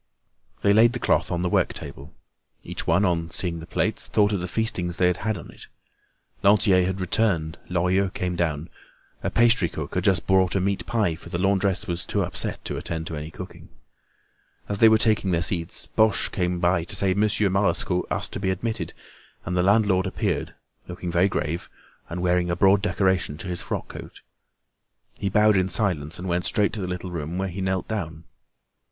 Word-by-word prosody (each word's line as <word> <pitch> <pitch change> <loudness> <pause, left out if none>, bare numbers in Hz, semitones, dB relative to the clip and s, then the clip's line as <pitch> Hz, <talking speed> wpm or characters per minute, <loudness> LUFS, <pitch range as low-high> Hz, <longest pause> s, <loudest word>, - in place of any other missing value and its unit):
They 100 - +5
laid 115 +3 +5
the 125 - -3
cloth - - +1
on 85 0 -1
the - - +1
work - - +1
table. 70 +3 -9 0.5
Each - - -6
one, 85 +5 +3
on 85 -2 0
seeing 85 0 -3
the 80 - -10
plates, 105 +5 0
thought 105 -1 +2
of 100 - 0
the 90 - -4
feastings 90 -4 -1
they 90 - +3
had 90 0 +2
had 110 +1 -2
on 80 - -10
it. - - -14 0.7
Lantier 100 -2 +4
had 95 +1 -2
returned. 90 -4 0
Lorilleux 90 +2 +1
came 90 -1 -3
down. 80 -2 -2 0.5
A - - -1
pastry 115 -7 +3
cook 75 -2 -6
had 90 - -1
just 95 -3 +2
brought 95 -1 +3
a - - +3
meat 100 +1 -1
pie, 105 -7 +1
for 80 - -11
the - - -3
laundress 95 +1 +1
was 85 -3 -3
too - - 0
upset - - -1
to - - -4
attend 80 -1 -4
to 80 - -5
any 75 +1 -6
cooking. 90 +2 -10 1.0
As 100 -1 -3
they 115 - +8
were 110 - +5
taking 110 -3 +2
their 85 -1 +1
seats, 85 -1 -1
Boche 110 -1 +2
came 90 -1 -1
to 85 -1 +1
say 95 -2 +3
that 100 - -2
Monsieur 105 -1 +2
Marescot 95 -2 0
asked - - -2
to - - -4
be 95 -1 -1
admitted, 110 +4 -3 0.5
and 90 - -2
the 90 - +3
landlord 100 -1 +3
appeared, - - -2 0.3
looking 90 0 -5
very 90 +3 +3
grave, 85 -1 -3 0.4
and 85 +2 -4
wearing 90 0 +2
a 85 - 0
broad 95 +2 +4
decoration 95 -6 0
on 95 - -7
his 90 -1 -3
frock - - -4
coat. - - -10 1.0
He 100 - -1
bowed 105 +2 +4
in 95 0 +2
silence 85 -7 0
and 90 +2 -6
went 90 0 -1
straight 105 -1 +1
to 110 - -2
the 90 - -3
little 90 0 -5
room, 85 0 -4
where 95 0 -1
he 95 +2 -6
knelt 95 0 -1
down. 85 -7 -4
95 Hz, 200 wpm, -24 LUFS, 85-100 Hz, 1.0 s, they